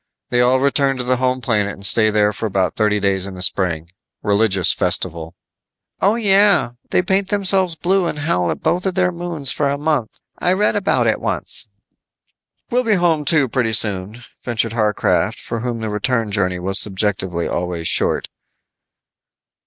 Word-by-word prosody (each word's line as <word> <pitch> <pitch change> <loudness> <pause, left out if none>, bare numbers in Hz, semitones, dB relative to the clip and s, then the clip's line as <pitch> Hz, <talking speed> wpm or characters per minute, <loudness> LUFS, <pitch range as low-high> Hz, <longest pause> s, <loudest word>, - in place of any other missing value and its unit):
They 120 - +2
all 125 +1 +3
return 140 0 +1
to 125 - -3
the 125 +1 0
home 130 0 0
planet 105 -4 0
and 100 - -11
stay 110 +1 +3
there 105 0 +2
for 110 - -3
about 95 -3 0
thirty 105 -1 +1
days 95 -1 0
in 95 - -8
the 90 - -2
spring. 85 -3 0 0.3
Religious 100 -3 +3
festival." 85 -1 -1 0.7
"Oh, 200 +3 +3
yeah. 200 - +3 0.2
They 180 - +2
paint 190 +2 0
themselves 190 -3 +2
blue 185 +1 +1
and 150 - -4
howl 145 - 0
at - - -4
both 180 +3 0
of 185 - -2
their 180 -1 +2
moons 170 -6 -2
for 140 +1 0
a 140 - -1
month. 145 -6 -2 0.2
I 180 - +2
read 205 +3 +1
about 200 -1 +1
it - - +1
once." - - -3 1.0
"We'll 250 +1 +2
be 220 -3 +2
home, 165 -4 +1
too, 145 -2 +3
pretty 115 -1 -1
soon," 105 +2 -1 0.2
ventured 115 -2 -2
Harcraft, 105 -3 0
for 115 - -5
whom 120 -1 -4
the 110 - -3
return 115 +1 -1
journey 90 -3 0
was 95 +3 +1
subjectively 95 -4 -1
always 85 -2 -3
short. - - +1
120 Hz, 175 wpm, -19 LUFS, -, 1.0 s, all